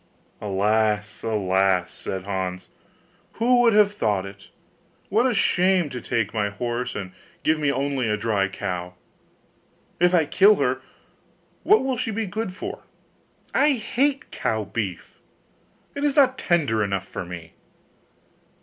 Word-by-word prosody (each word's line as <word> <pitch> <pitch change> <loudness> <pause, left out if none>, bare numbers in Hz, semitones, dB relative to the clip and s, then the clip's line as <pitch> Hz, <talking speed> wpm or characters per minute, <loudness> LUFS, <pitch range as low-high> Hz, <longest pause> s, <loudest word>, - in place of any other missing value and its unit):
'Alas, 105 +1 0
alas!' 95 -4 +1
said 95 -1 -5
Hans, 95 -2 -4 0.6
'who 245 +2 +3
would 235 -2 +5
have 210 -1 +5
thought 105 - 0
it? 100 0 -11 0.6
What 230 +6 +3
a - - 0
shame 185 -3 +2
to 125 - -5
take 115 -3 -1
my 105 -2 0
horse, 120 +4 -3
and 95 -2 -5 0.3
give 155 0 +2
me 145 -2 +2
only 135 -3 -1
a 105 - +1
dry 105 -2 +1
cow! 90 -2 -5 1.0
If 180 +1 +4
I 165 -3 +4
kill 200 +7 +5
her, - - 0 0.8
what 425 -5 +4
will 265 -1 -1
she 225 - -2
be 220 +1 -2
good 205 +1 -3
for? 185 - -7 0.7
I 290 +2 +4
hate 275 +4 -1
cow 110 -1 -1
beef; 100 -3 -5 0.7
it 285 - -4
is 290 -1 +1
not 265 -3 +5
tender 140 -11 +1
enough 100 -1 -2
for - - -5
me. 85 -2 -9
115 Hz, 140 wpm, -24 LUFS, -, 1.0 s, would